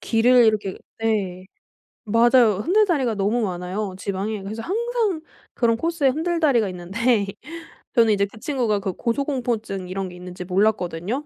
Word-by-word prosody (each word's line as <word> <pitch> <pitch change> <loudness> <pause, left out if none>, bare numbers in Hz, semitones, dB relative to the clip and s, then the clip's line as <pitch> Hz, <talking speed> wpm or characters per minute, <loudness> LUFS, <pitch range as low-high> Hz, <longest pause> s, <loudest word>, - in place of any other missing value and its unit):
길을 245 +2 +4
이렇게 210 -3 +1 0.2
네 200 -5 -1 0.6
맞아요. 230 0 +4
흔들 420 +6 +4
다리가 270 - 0
너무 210 +5 0
많아요 185 0 -3
지방에. 200 +2 -3
그래서 215 +3 -5
항상 445 -3 -1 0.3
그런 230 -2 +2
코스에 330 -3 +1
흔들다리가 310 - +1
있는데 200 +5 0 0.7
저는 230 -2 +5
이제 200 -1 +2
그 200 +2 -13
친구가 240 -6 0
그 195 -2 -3
고소공포증 235 - -2
이런 190 0 -3
게 180 - -11
있는지 180 0 -8
몰랐거든요. 195 - 0
220 Hz, 345 characters per minute, -23 LUFS, 195-255 Hz, 0.7 s, 저는